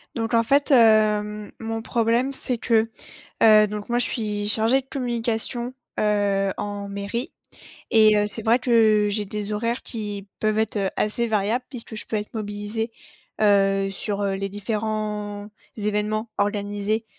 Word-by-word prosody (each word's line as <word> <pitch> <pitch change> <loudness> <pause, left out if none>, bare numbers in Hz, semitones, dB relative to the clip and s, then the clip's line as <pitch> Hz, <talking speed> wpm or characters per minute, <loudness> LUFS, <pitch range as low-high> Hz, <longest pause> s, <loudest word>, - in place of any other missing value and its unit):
Donc 225 -1 -2
en 230 - +5
fait, 280 +4 +2
heu, 210 -3 +3
mon 225 0 -4
problème, 235 +3 +1
c'est 250 -2 -3
que, 225 -1 +2 0.5
heu, 215 -1 +7
donc 210 +1 -6
moi 240 0 +1
je 245 - +3
suis 210 -3 -2
chargée 225 +5 +5
de - - -29
communication, 240 -1 -2 0.3
heu, 200 -2 +1
en 205 -1 -5
mairie 200 +6 -4 0.6
et 215 -2 +6
heu, 210 0 +2
c'est 225 +2 -5
vrai 230 +2 +4
que 220 -4 +4
j'ai 205 0 +1
des 210 +1 -4
horaires 230 +4 -1
qui 205 -3 -4
peuvent 215 0 0
être, 220 0 -2
heu, 195 -2 0
assez 225 +3 0
variables 220 +3 0
puisque 235 -4 -7
je - - -7
peux - - -6
être 210 0 -5
mobilisée, 210 +1 -4 0.5
heu, 195 -2 +3
sur, 200 +1 -4
heu, 200 -1 0
les 195 +1 -3
différents 210 0 -3 0.3
événements 210 +1 -1
organisés, 205 +1 -1
215 Hz, 155 wpm, -23 LUFS, 205-230 Hz, 0.6 s, heu